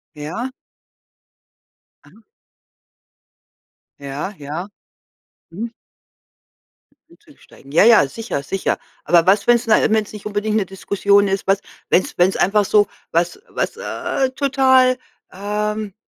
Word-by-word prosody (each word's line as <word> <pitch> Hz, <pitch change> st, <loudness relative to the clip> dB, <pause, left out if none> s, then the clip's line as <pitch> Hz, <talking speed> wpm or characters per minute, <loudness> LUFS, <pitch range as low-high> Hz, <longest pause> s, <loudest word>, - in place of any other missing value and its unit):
Ja. 165 Hz, -, -5 dB, 1.5 s
Aha. 220 Hz, -, -20 dB, 1.8 s
Ja, 140 Hz, +8 st, -5 dB
ja. 155 Hz, +7 st, -6 dB, 0.8 s
Mhm. 225 Hz, +7 st, -6 dB, 1.4 s
Einzusteigen. 290 Hz, -, -19 dB
Ja, 170 Hz, -, +5 dB
ja, 225 Hz, -11 st, +6 dB
sicher, 220 Hz, -, -5 dB
sicher. 195 Hz, +7 st, -2 dB, 0.3 s
Aber 170 Hz, 0 st, +4 dB
was, 200 Hz, +1 st, +3 dB
wenn's 240 Hz, 0 st, +3 dB
na 220 Hz, -, +4 dB
wenn's 215 Hz, -1 st, 0 dB
nicht 210 Hz, -1 st, -10 dB
unbedingt 210 Hz, +1 st, -1 dB
'ne 200 Hz, -3 st, +1 dB
Diskussion 200 Hz, +1 st, +1 dB
ist, 195 Hz, 0 st, -2 dB
was 195 Hz, 0 st, +2 dB, 0.3 s
wenn's 185 Hz, -, +1 dB
wenn's 180 Hz, +2 st, +3 dB
einfach 205 Hz, +2 st, +2 dB
so, 205 Hz, +1 st, +3 dB, 0.3 s
was 170 Hz, -, 0 dB
was, -, -, -3 dB
äh, 270 Hz, -, -2 dB
total 260 Hz, -2 st, +3 dB, 0.3 s
ähm, 210 Hz, +1 st, -3 dB
205 Hz, 110 wpm, -19 LUFS, 185-230 Hz, 1.8 s, ja